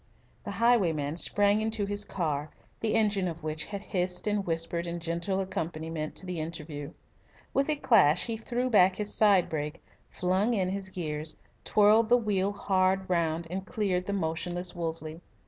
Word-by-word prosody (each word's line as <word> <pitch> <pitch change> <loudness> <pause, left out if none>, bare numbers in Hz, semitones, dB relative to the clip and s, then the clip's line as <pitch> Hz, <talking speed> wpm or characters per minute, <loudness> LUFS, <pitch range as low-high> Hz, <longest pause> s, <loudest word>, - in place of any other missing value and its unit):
The - - -4
highwayman 170 -11 +2
sprang 205 +3 +3
into 220 -1 -1
his 205 +1 -2
car, 155 -7 -2 0.3
the 225 -1 0
engine 205 -4 +2
of 165 -1 -6
which 155 0 -3
had 200 -1 -6
hissed 180 -1 -2
and 205 -1 +1
whispered 165 +1 -1
in 170 0 -3
gentle 170 +4 -2
accompaniment 160 -4 -4
to - - -6
the 180 -2 -4
interview. 155 -2 -6 0.6
With 275 +2 +1
a 305 - +2
clash 185 - +4
he 230 - -2
threw 240 +3 -2
back 190 -6 +5
his 210 0 -3
side 200 -4 +4
brake, 150 -1 -4 0.3
flung 190 +6 +1
in 185 -3 +1
his 195 0 -4
gears, 155 -4 -4 0.3
twirled 215 +2 +4
the 245 - +7
wheel 200 -4 0
hard 190 -1 +1
round, 165 -1 +1
and 190 +1 -3
cleared 190 -4 -1
the 200 - -1
motionless 175 0 -2
Wolseley. 160 -1 -4
185 Hz, 165 wpm, -29 LUFS, 165-205 Hz, 0.6 s, the